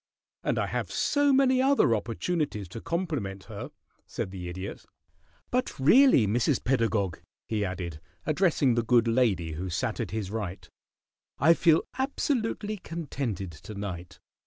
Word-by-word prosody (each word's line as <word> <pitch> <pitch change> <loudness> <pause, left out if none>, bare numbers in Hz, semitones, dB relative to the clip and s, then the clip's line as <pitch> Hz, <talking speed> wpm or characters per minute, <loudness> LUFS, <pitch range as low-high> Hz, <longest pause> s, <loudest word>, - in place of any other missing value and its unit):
"And - - 0
I - - +1
have - - -3
so 285 -1 +2
many 260 -1 +4
other 270 - +4
opportunities 115 - -2
to 110 - -8
compliment 145 - -3
her," - - -7 0.4
said 95 - -4
the 90 -2 -6
Idiot. 95 +3 -6 0.7
"But 250 - -1
really, 190 - +6
Mrs. 120 +6 +1
Pedagog," 110 -9 +1 0.3
he 110 -2 -1
added, 85 -4 -4 0.2
addressing 155 -5 +2
the 120 - +2
good 115 0 +3
lady 110 -9 +2
who 90 +4 -4
sat 110 +6 -2
at - - -2
his 105 -3 -4
right, 100 -5 -5 0.7
"I 160 +5 +6
feel 165 -1 +4 0.2
absolutely 225 -6 -1
contented 135 - -4
to 80 +8 -10
night. 90 -4 -6
115 Hz, 140 wpm, -28 LUFS, -, 0.7 s, really